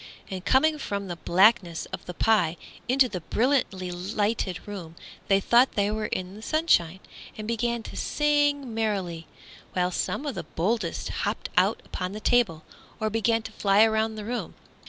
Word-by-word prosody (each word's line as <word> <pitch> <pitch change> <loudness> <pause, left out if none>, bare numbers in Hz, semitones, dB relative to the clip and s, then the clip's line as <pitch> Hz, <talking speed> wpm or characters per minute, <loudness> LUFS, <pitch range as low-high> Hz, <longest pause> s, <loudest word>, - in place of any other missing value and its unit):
And 185 -1 -5
coming 305 +7 +3
from 200 -6 -3
the 175 - -3
blackness 185 0 +3
of - - -5
the 180 - -6
pie 180 -7 +2 0.3
into 260 +1 +5
the 185 -7 -5
brilliantly 210 - 0
lighted 200 +1 -2
room 175 -6 -7 0.3
they 195 -1 +4
thought 240 +6 +4
they 205 0 +1
were 215 0 -2
in 185 0 -4
the 210 - -11
sunshine, 220 - +2 0.4
and 215 -1 -6
began 235 0 -1
to - - -9
sing 290 -4 +1
merrily, 195 -7 -2 0.5
while 180 0 +1
some 275 - -2
of 285 - -2
the - - -4
boldest 190 +1 -2
hopped - - -2
out - - +3
upon 180 +1 -4
the 210 - -5
table 215 -10 +2 0.4
or 215 0 -1
began 225 +1 +1
flying 205 +1 +3
around 220 0 0
the 210 -1 -6
room. 245 +2 -4
215 Hz, 165 wpm, -26 LUFS, 185-235 Hz, 0.5 s, into